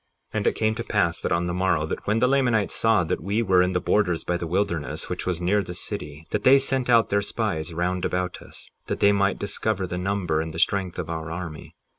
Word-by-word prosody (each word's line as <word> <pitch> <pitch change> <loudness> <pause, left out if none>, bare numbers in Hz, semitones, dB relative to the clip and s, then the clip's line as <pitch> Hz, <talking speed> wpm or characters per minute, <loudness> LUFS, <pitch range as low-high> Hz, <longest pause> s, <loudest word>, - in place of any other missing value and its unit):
58:14 - - -1
And - - -1
it - - +2
came 110 0 +1
to 115 +1 -4
pass 85 -7 0
that - - -2
on 85 +1 +1
the 85 - -2
morrow, 90 -4 +1
that - - -5
when 105 +2 +2
the 125 +2 +3
Lamanites 125 -6 +2
saw 110 -4 +3
that 80 - -2
we 100 +6 0
were 95 -3 +4
in 90 +1 +1
the 90 - +1
borders 90 -4 +1
by 90 - -1
the 85 -1 -3
wilderness 85 -3 -2
which - - -4
was 90 -3 -1
near 95 +4 +2
the 90 -3 -7
city, 75 -2 -6
that 105 - -1
they 135 +2 +7
sent 135 -2 0
out 115 -2 +5
their 100 0 +3
spies 100 -7 -2
round 90 +2 -1
about 90 -1 -2
us - - -9 0.2
that - - -2
they 100 - +5
might 100 -1 +1
discover 100 -1 -1
the 90 0 -4
number 90 -4 0
and 80 0 -6
the - - -4
strength 95 0 +1
of - - -3
our 80 -1 -4
army. 80 -2 -7
90 Hz, 250 wpm, -25 LUFS, 85-105 Hz, 0.2 s, they